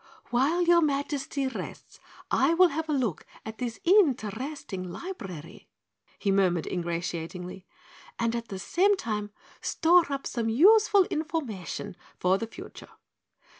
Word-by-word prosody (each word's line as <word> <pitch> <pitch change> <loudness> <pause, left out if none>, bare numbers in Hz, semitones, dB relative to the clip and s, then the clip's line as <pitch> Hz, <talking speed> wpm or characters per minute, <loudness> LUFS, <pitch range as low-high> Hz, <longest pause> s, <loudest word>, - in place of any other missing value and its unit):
"While 285 +9 +2
your 345 0 +5
Majesty 280 -1 -1
rests 260 - -7 0.3
I 280 +6 +3
will 365 +1 +6
have 320 +1 -4
a - - +1
look 250 - -1 0.2
at 220 0 -8
this 240 -3 -4
interesting 260 - +1
library," 185 - -8 0.5
he 200 - 0
murmured 185 -4 +2
ingratiatingly, 175 +1 -4 0.5
"and 230 0 0
at 235 0 -4
the 195 - -6
same 385 - +2
time 210 - -3 0.3
store 335 -1 +3
up 275 0 -3
some 230 -2 -2
useful 405 - +6
information 275 - -4 0.2
for 185 +2 +2
the 230 - -4
future." - - -11
245 Hz, 130 wpm, -27 LUFS, 195-325 Hz, 0.5 s, will